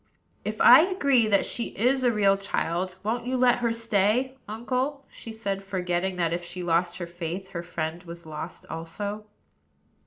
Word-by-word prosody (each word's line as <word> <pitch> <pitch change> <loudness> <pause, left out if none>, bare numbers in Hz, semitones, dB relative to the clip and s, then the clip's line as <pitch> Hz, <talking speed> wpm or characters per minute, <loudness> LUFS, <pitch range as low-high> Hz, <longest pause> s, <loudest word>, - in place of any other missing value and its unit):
"If - - -4
I - - +10
agree 280 - +3
that 200 -2 +3
she 235 - -3
is 255 +5 +2
a 245 - +4
real 200 -3 +4
child, 185 -2 -2
won't 235 +3 -2
you 260 0 0
let 250 -1 +4
her 235 -1 +1
stay, 230 +3 +1
uncle?" 255 +6 -2
she 225 - -9
said, 200 -3 -3
forgetting 185 -1 -1
that, 170 -2 0
if 175 0 -3
she 175 +1 -6
lost 175 +1 +1
her 175 - -4
faith, 175 +2 -6
her 175 -3 -5
friend 170 0 -4
was 170 -1 -10
lost 155 +2 -7
also. 205 +6 -5
195 Hz, 175 wpm, -26 LUFS, 175-235 Hz, -, I